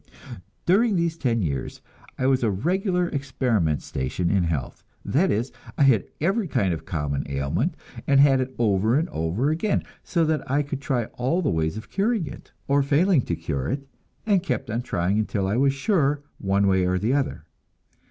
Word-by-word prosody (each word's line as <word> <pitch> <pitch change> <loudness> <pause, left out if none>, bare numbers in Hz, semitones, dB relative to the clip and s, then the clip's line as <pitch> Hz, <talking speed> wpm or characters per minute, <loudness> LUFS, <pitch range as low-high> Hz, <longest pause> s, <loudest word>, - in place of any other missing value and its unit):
During 205 +4 +3
these 170 -2 0
ten 120 -9 0
years 70 -5 -3 0.4
I 130 - -1
was 130 -1 +3
a 115 - +2
regular 180 - 0
experiment 120 - 0
station 65 +7 -2
in 95 -3 +2
health; 80 -5 -3 0.2
that 180 +8 +2
is, 115 +5 0 0.3
I - - +4
had 120 -9 +4
every 195 +6 +1
kind 95 - +1
of 80 - -6
common 75 -4 -2
ailment, 70 0 -1 0.3
and 140 -1 +5
had 135 -2 +5
it 130 0 -4
over 110 +1 +2
and 165 +3 +1
over 95 - 0
again, 180 +7 0 0.2
so 170 -2 +1
that 155 -3 -1
I 145 +2 +2
could 140 -1 -5
try 125 -5 0
all 160 +9 +1
the 145 - +1
ways 80 +4 -1
of 110 - -9
curing 205 -1 +1
it, - - -10 0.2
or 140 +1 +3
failing 150 +3 +3
to 85 - -1
cure 75 -5 -3
it, 140 0 -3 0.4
and 200 -4 +3
keep 175 - -3
on 115 +2 -1
trying 95 -2 0
until 105 -2 -1
I 100 +3 0
was 135 +2 +3
sure, 145 -2 +1 0.2
one 100 0 +1
way 95 -1 +3
or 90 0 +1
the 110 +7 0
other. 135 - -1
130 Hz, 190 wpm, -24 LUFS, 95-155 Hz, 0.4 s, and